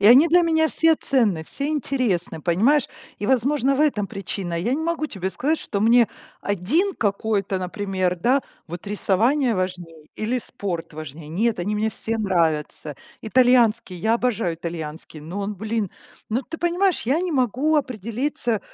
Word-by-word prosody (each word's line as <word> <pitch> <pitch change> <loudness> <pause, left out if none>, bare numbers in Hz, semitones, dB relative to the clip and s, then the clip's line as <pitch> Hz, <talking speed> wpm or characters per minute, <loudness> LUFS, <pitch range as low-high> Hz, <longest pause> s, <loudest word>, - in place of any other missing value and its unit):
и 200 - +4
они 270 +9 +8
для 350 +2 +5
меня 320 -1 +3
все 325 -1 +3
ценны, 215 - +1
все 280 - -3
интересны, 245 - -1
понимаешь, 235 - +3 0.3
и, 205 - -3
возможно, 265 +2 +2
в - - 0
этом 235 -10 +2
причина. 190 -4 -4
Я 235 +9 0
не 310 - -2
могу 325 -2 -1
тебе 190 -7 -4
сказать, 290 - 0
что 200 - -3
мне 230 +2 +5 0.3
один 255 - 0
какой-то, 200 -2 0
например, 185 0 -1
да, 255 +10 +2 0.2
вот 175 +4 -8
рисование 230 +6 +2
важнее 175 -4 -4
или 230 +4 -1
спорт 180 -8 -5
важнее. 155 0 -8
Нет, 215 +7 0
они 195 +4 -1
мне 220 +1 0
все 225 +1 -3
нравятся. 160 -6 0 0.3
Итальянский, 240 -4 +3
я 220 +6 +1
обожаю 225 -8 0
итальянский, 160 -2 -7
но 170 +7 -6
он, 205 +1 -3
блин, 215 +1 -2 0.4
ну, 235 +5 0
ты 325 +5 -8
понимаешь, 355 +1 +1
я 275 +8 +1
не 360 -1 -2
могу 265 +4 +2
определиться, 235 -2 -1
220 Hz, 160 wpm, -23 LUFS, 185-265 Hz, 0.4 s, они